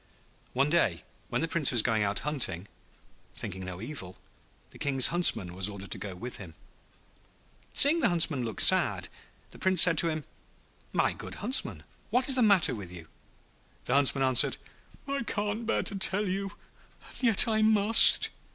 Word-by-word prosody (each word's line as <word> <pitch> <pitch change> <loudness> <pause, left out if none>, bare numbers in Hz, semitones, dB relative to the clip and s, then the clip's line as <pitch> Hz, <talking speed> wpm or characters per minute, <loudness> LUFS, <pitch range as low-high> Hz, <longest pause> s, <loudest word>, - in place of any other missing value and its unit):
One 140 +3 -1
day 110 - 0 0.3
when - - -3
the 165 - -2
Prince 165 -3 -1
was 120 -4 +1
going 110 -3 -1
out 100 -1 -2
hunting, 105 - -3 0.7
thinking 95 +1 -7
no 90 -1 -9
evil, 110 -6 -9 0.5
the - - -17
King's 135 -3 +2
Huntsman 110 - +3
was 95 +2 -4
ordered 100 -1 -11
to - - -5
go 100 -3 -8
with 120 +7 -8
him. 85 -6 -12 1.2
Seeing 300 +4 +4
the 240 - +1
Huntsman 165 -7 0
look 115 -2 -6
sad, - - +3 0.4
the - - -16
Prince 190 -1 +4
said 165 -4 +2
to 170 - +1
him, 155 -1 -5 0.7
'My - - -1
good - - -10
Huntsman, 250 +7 -1 0.3
what 250 +1 0
is 270 - +2
the 255 - +1
matter 200 - +3
with 100 -6 -9
you?' 85 -3 -13 0.8
The - - -3
Huntsman 135 -1 +2
answered, 130 -1 +1 0.5
'I 275 0 -3
can't 210 +2 -4
bear - - -1
to 200 - -2
tell 195 +1 +1
you, 195 +1 -5 0.5
and - - -8
yet 230 -3 +6
I 220 -1 0
must.' 215 0 +5
150 Hz, 170 wpm, -27 LUFS, -, 1.2 s, yet